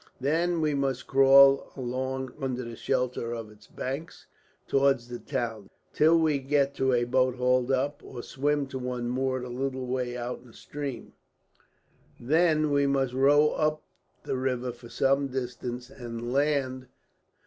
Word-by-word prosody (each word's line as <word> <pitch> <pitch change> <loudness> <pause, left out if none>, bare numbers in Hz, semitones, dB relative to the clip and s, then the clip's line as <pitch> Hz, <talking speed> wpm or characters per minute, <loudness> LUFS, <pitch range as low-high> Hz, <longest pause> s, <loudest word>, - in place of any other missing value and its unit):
"Then 165 +5 +1
we 155 -1 +1
must 135 -2 -1
crawl 135 0 +6
along 130 +1 -3
under 130 -1 -2
the 115 -1 -7
shelter 120 0 -1
of 115 -2 -7
its 105 - -19
banks 135 +5 -6 0.4
towards 135 -3 +2
the 120 0 -6
town, 110 -4 -4 0.2
till 160 +2 +5
we 155 -3 +2
get 140 +1 +1
to 130 0 +2
a 120 -1 +2
boat 130 +1 +1
hauled 125 0 +1
up, 135 +2 0
or 120 -2 -8
swim 145 +1 -1
to 130 - -5
one 125 -1 -3
moored 130 0 -1
a - - -6
little 130 +1 -3
way 125 -1 -2
out 120 +1 -4
in 125 - -18
the 115 - -17
stream. 140 -1 -7 1.1
Then 155 +3 +2
we 140 0 +3
must 135 -2 0
row 145 +3 +5
up 155 0 -1 0.4
the - - -2
river 125 -1 -1
for 120 0 -14
some 135 +3 +1
distance, 125 -1 -5
and 120 -2 -6
land." 135 -3 0
130 Hz, 160 wpm, -27 LUFS, 125-140 Hz, 1.1 s, crawl